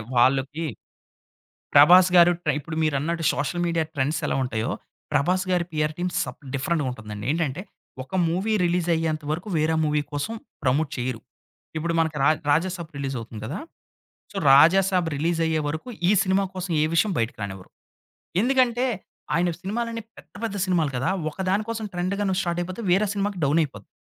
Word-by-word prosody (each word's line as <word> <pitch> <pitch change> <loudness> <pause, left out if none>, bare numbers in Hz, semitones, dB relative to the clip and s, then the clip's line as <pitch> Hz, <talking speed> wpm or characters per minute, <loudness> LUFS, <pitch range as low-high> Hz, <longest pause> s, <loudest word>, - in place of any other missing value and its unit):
వాళ్ళకి, 135 +6 +2 1.1
ప్రభాస్‌గారు 180 -1 +7
ట్రే 150 - +1
ఇప్పుడు 155 +2 -7
మీరు 155 -2 +1
అన్నట్టు 165 +3 -2
సోషల్ 160 +5 -2
మీడియా 165 -1 +1
ట్రెండ్స్ 145 +3 0
ఎలా - - 0
ఉంటాయో. 115 +1 -2 0.4
ప్రభాస్‌‌గారి 180 +4 +1
పిఆర్ 150 0 0
టీమ్ 180 +1 -2
స - - 0 0.3
డిఫరెంట్‌గా 150 +2 0
ఉంటుందండి. 105 -3 -7
ఏంటంటే 160 0 -2 0.4
ఒక 135 - -11
మూవీ 190 +6 0
రిలీజ్ 175 0 0
అయ్యేంత 160 -2 -1
వరకు, 175 +7 -4
వేరే 155 +1 +2
మూవీ 150 -1 +1
కోసం 145 +10 -2 0.3
ప్రమోట్ 140 +3 +1
చేయరు. 125 -2 -3 0.6
ఇప్పుడు 170 +1 -2
మనకు 160 -2 0
రా - - +5 0.2
'రాజాసాబ్' 170 +2 0
రిలీజ్ 135 -1 -3
అవుతుంది 115 -1 -9
కదా! 150 - -4 0.7
సో - - -9 0.2
రాజాసాబ్ 180 +4 +5
రిలీజ్ 165 +3 0
అయ్యే 160 -1 +1
వరకు, 155 +10 -5 0.2
ఈ - - +5
సినిమా 190 +1 +2
కోసం 185 -1 -5
ఏ - - +4
విషయం 205 +5 +3
బయటికి 115 -1 -2
రానివ్వరు. 95 -2 -7 0.7
ఎందుకంటే, 250 0 +2 0.5
ఆయన 175 +2 +2
సినిమాలన్ని 230 +3 -3
పెద్ద - - -16
పెద్ద 210 -3 -2
సినిమాలు 170 -6 +1
కదా! 130 - 0 0.2
ఒక - - -20
దాని 200 +3 +2
కోసం 225 -1 -3
ట్రెండ్‌గాని 190 +2 -1
స్టార్ట్ 175 -2 -1
అయిపోతే, 185 +5 -5
వేరే 195 +4 +3
సినిమాకి 200 -1 -2
డౌన్ 145 +4 +3
అయిపోతుంది. 110 -9 -9
165 Hz, 160 wpm, -24 LUFS, 145-185 Hz, 1.1 s, ప్రభాస్‌గారు